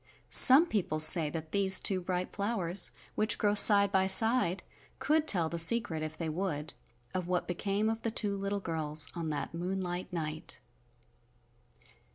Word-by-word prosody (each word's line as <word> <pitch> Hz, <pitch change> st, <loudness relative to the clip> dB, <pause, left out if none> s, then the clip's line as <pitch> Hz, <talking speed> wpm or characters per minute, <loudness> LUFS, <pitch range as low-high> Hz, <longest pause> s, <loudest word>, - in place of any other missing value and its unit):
Some 270 Hz, +6 st, +7 dB
people 195 Hz, -, -4 dB
say 155 Hz, 0 st, +6 dB
that 160 Hz, 0 st, -9 dB
these 195 Hz, -2 st, +1 dB
two 190 Hz, -2 st, -2 dB
bright 180 Hz, 0 st, -6 dB
flowers, 200 Hz, -4 st, -1 dB, 0.2 s
which 215 Hz, 0 st, 0 dB
grow 205 Hz, -1 st, -1 dB
side 200 Hz, -1 st, +6 dB
by 190 Hz, -1 st, 0 dB
side, 210 Hz, -1 st, +1 dB, 0.3 s
could 310 Hz, +1 st, -2 dB
tell 175 Hz, -, +2 dB
the 170 Hz, +1 st, -5 dB
secret 165 Hz, -2 st, +2 dB
if 155 Hz, 0 st, -8 dB
they 165 Hz, -, -6 dB
would, 155 Hz, -2 st, -6 dB, 0.4 s
of 185 Hz, -2 st, -5 dB
what 180 Hz, 0 st, -4 dB
became 195 Hz, +4 st, -4 dB
of 225 Hz, 0 st, -4 dB
the 230 Hz, -, -4 dB
two 210 Hz, -3 st, -4 dB
little 200 Hz, +1 st, -5 dB
girls 155 Hz, -3 st, +1 dB
on 165 Hz, -2 st, -7 dB
that 150 Hz, +1 st, -6 dB
moonlight 180 Hz, +1 st, -6 dB
night. 155 Hz, -3 st, -7 dB
185 Hz, 160 wpm, -28 LUFS, 165-205 Hz, 0.4 s, Some